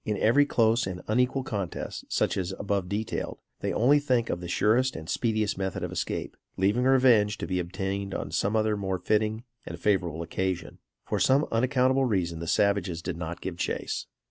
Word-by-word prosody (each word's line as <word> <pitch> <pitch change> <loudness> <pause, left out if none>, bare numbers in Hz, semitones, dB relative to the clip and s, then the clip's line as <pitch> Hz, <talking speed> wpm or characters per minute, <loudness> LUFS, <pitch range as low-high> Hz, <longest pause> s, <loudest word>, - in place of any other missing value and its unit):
In 105 -2 -1
every 140 +8 +4
close 115 -3 +2
and 90 -1 -5
unequal 125 +4 +1
contest, 100 -8 -4
such - - +1
as 95 0 -2
above 100 -3 -1
detailed, 105 +2 -3 0.2
they - - -2
only 140 +6 +4
think 125 -5 +1
of - - -2
the 90 - -6
surest 115 +8 +2
and 80 0 -7
speediest 110 -1 0
method 95 -2 -2
of - - -3
escape, - - -3 0.2
leaving 105 +7 +2
revenge 125 -6 +4
to - - -4
be 90 -1 -1
obtained 95 +2 -3
on 70 - -4
some 100 +6 0 0.3
more 95 -1 -1
fitting 110 +4 0 0.2
and 85 +1 -8
favorable 85 -5 0
occasion. 95 +2 -3 0.3
For - - -1
some 140 +3 +4
unaccountable 130 +2 +2
reason 90 -8 0
the 85 - -5
savages 95 -3 +1
did 90 -1 -3
not 85 +1 -5
give 90 -2 -5
chase. - - -3
100 Hz, 180 wpm, -27 LUFS, 90-120 Hz, 0.3 s, every